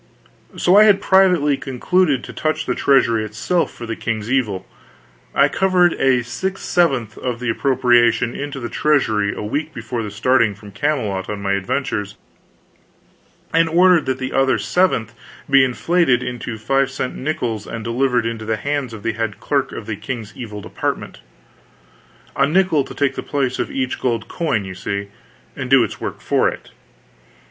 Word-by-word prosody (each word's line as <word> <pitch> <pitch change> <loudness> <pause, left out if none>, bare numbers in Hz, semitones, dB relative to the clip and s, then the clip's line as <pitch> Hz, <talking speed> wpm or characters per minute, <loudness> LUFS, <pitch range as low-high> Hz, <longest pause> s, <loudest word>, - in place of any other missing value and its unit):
So 180 +3 +4
I 210 - +8
had 205 -2 +5
privately 180 -7 +3
concluded 140 +2 +1
to - - -9
touch 155 0 -1
the 125 - 0
treasury 115 -6 +3
itself 110 - -1
for 120 - -9
the 115 -1 -4
king's 110 0 -3
evil. 110 -9 0 0.7
I - - +5
covered 180 -2 +2 0.3
six 190 +10 -4
sevenths 135 - +1
of 125 -2 -3
the 125 -1 -1
appropriation 120 -2 +2
into 145 -1 -5
the 120 - -4
treasury 110 -9 +1
a - - -6
week 150 +8 -3
before 115 -2 -4
starting 115 0 +2
from 105 0 -13
Camelot 105 -6 -2
on 105 -1 -4
my 100 0 -2
adventures, 105 0 -2 1.4
and 165 0 +3
ordered 175 0 +4
that 130 -1 0
the 130 0 -4
other 135 0 +3
seventh 120 - +1 0.3
be 140 -1 +6
inflated 130 0 +2
into 120 -2 -5
five 135 +4 +1
cent 130 -1 -4
nickels 120 -7 -3
and 115 -1 -6
delivered 125 0 +1
into 115 -1 -3
the 110 0 -1
hands 140 -1 -2
of 105 -2 -9
the 115 - -1
head 115 -2 -3
clerk - - -1
of - - -7
the - - -4
King's 115 -5 -6
Evil 105 -4 -7
Department; - - -4 1.2
a 140 - +3
nickel 170 -2 +2
to - - -10
take 140 -2 +1
the - - -5
place 135 -3 -2
of - - -1
each 130 -2 -2
gold 115 -3 -1
coin, 140 - -1
you 95 - -6
see, 100 +2 -4 0.5
and 130 -1 -5
do 135 -2 +6
its - - -5
work - - -5
for - - +2
it. - - -10
125 Hz, 170 wpm, -20 LUFS, 110-145 Hz, 1.4 s, I